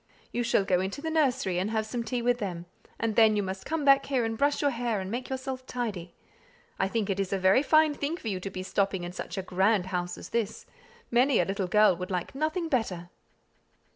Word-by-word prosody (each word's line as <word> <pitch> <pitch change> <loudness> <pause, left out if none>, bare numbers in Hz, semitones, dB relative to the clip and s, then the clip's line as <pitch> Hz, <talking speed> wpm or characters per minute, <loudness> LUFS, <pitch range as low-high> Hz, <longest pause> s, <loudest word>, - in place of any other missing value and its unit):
You 240 - -1
shall 230 -4 +2
go 180 -2 +2
into 190 +7 -3
the 320 +2 -3
nursery, 255 - +1
and 190 +3 -1
have 220 -1 -1
some 235 +2 -3
tea 240 0 -2
with 245 0 +2
them; 175 -5 -4 0.3
and 225 -2 -1
then 220 -1 +6
you 205 - +1
must 190 0 -5
come 315 -2 -1
back 275 0 +6
here 260 -4 +1
and 225 0 -2
brush 285 +5 +1
your 285 -1 +2
hair 235 -3 -1
and 190 0 -5
make 245 +2 -4
yourself 260 0 -4
tidy. 200 -9 -4 0.6
I 190 - +2
think 215 0 -1
it 195 - -2
is 195 -1 -1
a 195 - +1
very 190 +6 +4
fine 310 0 +4
thing 290 +3 -3
for 240 - -8
you 195 -4 -1
to 195 - -5
be 185 -1 -6
stopping 195 -1 0
in 175 - -5
such 185 - -6
a 190 - -2
grand 190 +2 +2
house 175 0 -2
as - - -9
this; 225 -3 -2 0.5
many 250 +1 +4
a - - +3
little 195 -1 -2
girl 210 0 +5
would 180 +1 -5
like 180 -2 -3
nothing 315 +5 -1
better." 185 - -2
220 Hz, 235 wpm, -28 LUFS, 190-255 Hz, 0.6 s, then